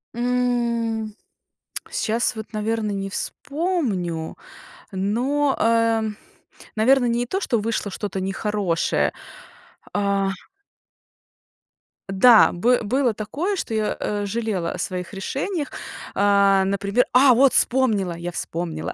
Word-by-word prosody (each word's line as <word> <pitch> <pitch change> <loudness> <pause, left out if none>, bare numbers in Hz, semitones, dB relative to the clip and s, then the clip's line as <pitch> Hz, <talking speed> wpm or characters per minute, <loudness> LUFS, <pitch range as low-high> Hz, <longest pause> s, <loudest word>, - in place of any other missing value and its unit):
М, 235 -3 -1 0.8
сейчас 235 +3 0
вот, 220 +1 -8
наверно, 215 0 -1
не 195 -1 -3
вспомню, 230 - -2 0.6
но, 250 +9 0
э, 230 0 +3 0.7
наверно, 250 +4 +4
не 240 0 0
то, 375 +10 -2
что 235 - 0
вышло 215 -1 -2
что-то 195 0 -4
нехорошее, 195 -2 0 0.8
а 200 -1 +1 1.8
Да, 215 +4 +6
бы 240 +8 +2
было 245 +2 +1
такое, 285 - -3
что 225 - -4
я, 215 -1 0
а, 205 -1 -2
жалела 200 -5 -2
о - - -6
своих 180 -1 -4
решениях, 285 - -3 0.4
а, 200 -1 +4
например. 200 +5 +1
А, 255 +1 +6
вот 260 +2 +4
вспомнила, 220 -8 +2
я 170 +1 -5
вспомнила! 165 -1 -4
220 Hz, 110 wpm, -22 LUFS, 195-245 Hz, 1.8 s, Да